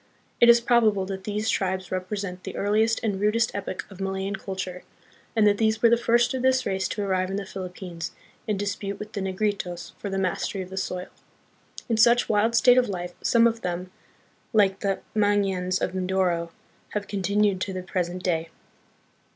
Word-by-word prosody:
It 235 - +7
is 235 0 +7
probable 220 -5 +3
that 190 0 -6
these 210 +1 -2
tribes 190 -2 -1
represent 185 0 -3
the - - -6
earliest 220 +3 +2
and 205 -4 -1
rudest 225 +2 +2
epoch 195 -2 -4
of 195 0 -10
Malayan 195 +1 -2
culture, 190 -2 -5 0.5
and 220 -2 +4
that 205 -1 +4
these 220 0 +1
were 230 - +7
the - - +7
first 235 +1 +2
of 260 - -2
this 260 0 +3
race 190 -1 0
to 205 - -3
arrive 185 -1 0
in 195 - -3
the 200 0 -3
Philippines 180 -3 -6 0.4
and 210 -2 0
dispute 200 0 -3
with 210 +1 -8
the 200 - -3
Ne 190 0 -2
gritos 185 -3 -2
for 200 - -4
the 195 - -2
mastery 190 +1 -1
of 185 - -12
the - - -6
soil. 180 -1 -3 0.8
In 230 - +1
such 235 +2 +5
wild 220 +2 +2
state 245 +2 +6
of 250 - 0
life, 175 -2 -4
some 230 -1 +4
of 230 0 +1
them, 180 +1 -4 0.6
like 195 -3 +3
the 195 -2 -1
Mangyans 195 -3 +1
of 180 - -2
Mindoro, 185 -2 0 0.5
have 205 -1 -2
continued 200 0 +1
to 195 - -2
the 185 -1 -5
present 180 -1 -3
day. 165 -2 0
195 Hz, 190 wpm, -25 LUFS, 185-215 Hz, 0.8 s, It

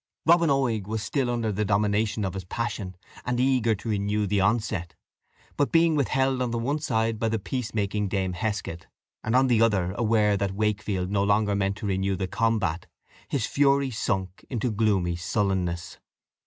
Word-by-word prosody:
Robin 170 0 +5
Oig 120 -8 +1
was 110 0 -3
still 135 -1 -1
under 115 -2 -1
the 105 +1 -1
dominion 105 +1 +1
of 95 - -3
his 95 -1 -5
passion, 100 -3 -4 0.3
and 125 0 -1
eager 125 -4 +2
to 105 - -10
renew 105 0 0
the 100 0 +1
onset; 95 -5 0 0.6
but 145 - +1
being 165 -1 +4
withheld 135 -2 +1
on 125 - 0
the 115 - -2
one 140 +6 -1
side 115 -6 0
by 115 - +1
the 110 - 0
peacemaking 105 -2 -2
Dame 95 -1 -1
Heskett, 100 -4 -4 0.4
and 110 - 0
on 130 +1 +5
the 120 -3 +3
other 100 -6 +2
aware 105 -3 +2
that 100 -1 -1
Wakefield 100 -3 -1
no 100 -1 +2
longer 105 0 +2
meant 100 0 0
to 105 - -6
renew 95 0 0
the 95 - -2
combat, 100 -5 0 0.4
his 130 -6 -1
fury 140 0 +2
sunk 95 -5 -2
into 120 -1 -1
gloomy 100 -5 +1
sullenness. 90 -1 -2
105 Hz, 175 wpm, -26 LUFS, 100-120 Hz, 0.6 s, Robin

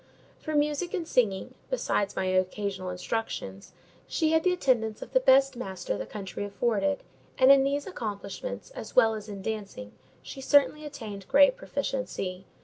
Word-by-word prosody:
For 310 -1 -4
music 295 +5 0
and 340 -4 -3
singing, 200 -10 +1 0.2
besides 205 - 0
my - - -1
occasional 185 0 -1
instructions, 180 - -4 0.4
she 315 -2 +1
had 320 0 +3
the 365 - +3
attendance 235 -10 +1
of - - -14
the - - +6
best 270 - +5
master 190 - -4
the 105 - -5
country 200 - -6
afforded; 235 +6 0 0.3
and 260 +1 +7
in 275 -1 +7
these 280 +1 0
accomplishments, 220 - -6
as - - -9
well 225 -3 +6
as 215 -1 -7
in 200 -2 -7
dancing, 200 - -5 0.3
she 270 - -8
certainly 290 +2 +3
attained 215 -9 -8
great 280 -2 +6
proficiency. 195 -6 -4
225 Hz, 155 wpm, -28 LUFS, 195-285 Hz, 0.4 s, and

